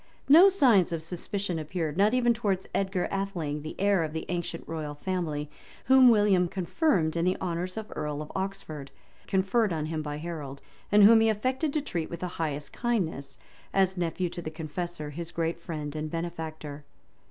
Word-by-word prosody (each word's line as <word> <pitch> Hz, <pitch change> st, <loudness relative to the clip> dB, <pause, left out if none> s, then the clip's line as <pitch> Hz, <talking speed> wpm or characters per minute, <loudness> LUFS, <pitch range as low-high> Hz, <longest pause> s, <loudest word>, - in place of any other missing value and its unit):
No 335 Hz, +8 st, +9 dB
signs 250 Hz, -, +4 dB
of 165 Hz, -2 st, -3 dB
suspicion 180 Hz, +1 st, -3 dB
appeared, 155 Hz, -1 st, -3 dB
not 205 Hz, +6 st, +3 dB
even 240 Hz, -1 st, +4 dB
towards 200 Hz, -5 st, -1 dB
Edgar 190 Hz, -2 st, 0 dB
Atheling, 175 Hz, -7 st, -2 dB
the 155 Hz, -, -7 dB
heir 200 Hz, -3 st, +3 dB
of 155 Hz, -1 st, -4 dB
the 160 Hz, -, -4 dB
ancient 175 Hz, -1 st, -4 dB
royal 155 Hz, -2 st, -4 dB
family, 155 Hz, -3 st, -2 dB, 0.4 s
whom 260 Hz, -1 st, +7 dB
William 205 Hz, -5 st, +4 dB
confirmed 180 Hz, -, +1 dB
in 170 Hz, -, +1 dB
the 185 Hz, +1 st, +1 dB
honors 180 Hz, +2 st, -3 dB
of 220 Hz, -1 st, -6 dB
earl 150 Hz, -1 st, -3 dB
of 150 Hz, -, -11 dB
Oxford, 190 Hz, -7 st, -5 dB, 0.4 s
conferred 200 Hz, +2 st, +2 dB
on 155 Hz, -2 st, -1 dB
him 155 Hz, 0 st, -3 dB
by 150 Hz, -1 st, -4 dB
Harold, 150 Hz, -4 st, -6 dB, 0.3 s
and 205 Hz, 0 st, +7 dB
whom 225 Hz, +2 st, +8 dB
he 225 Hz, -, +4 dB
affected 255 Hz, +8 st, 0 dB
to 305 Hz, -, +1 dB
treat 175 Hz, -, -3 dB
with 170 Hz, -, -7 dB
the 180 Hz, -, -1 dB
highest 150 Hz, -2 st, -3 dB
kindness, 165 Hz, -, -2 dB, 0.4 s
as 190 Hz, -1 st, +3 dB
nephew 175 Hz, 0 st, -1 dB
to 175 Hz, -, -6 dB
the 155 Hz, -, -5 dB
Confessor, 160 Hz, 0 st, -5 dB
his 165 Hz, +3 st, -5 dB
great 165 Hz, 0 st, -2 dB
friend 155 Hz, -3 st, -5 dB
and 155 Hz, 0 st, -3 dB
benefactor. 160 Hz, -3 st, -5 dB
175 Hz, 180 wpm, -28 LUFS, 155-200 Hz, 0.4 s, No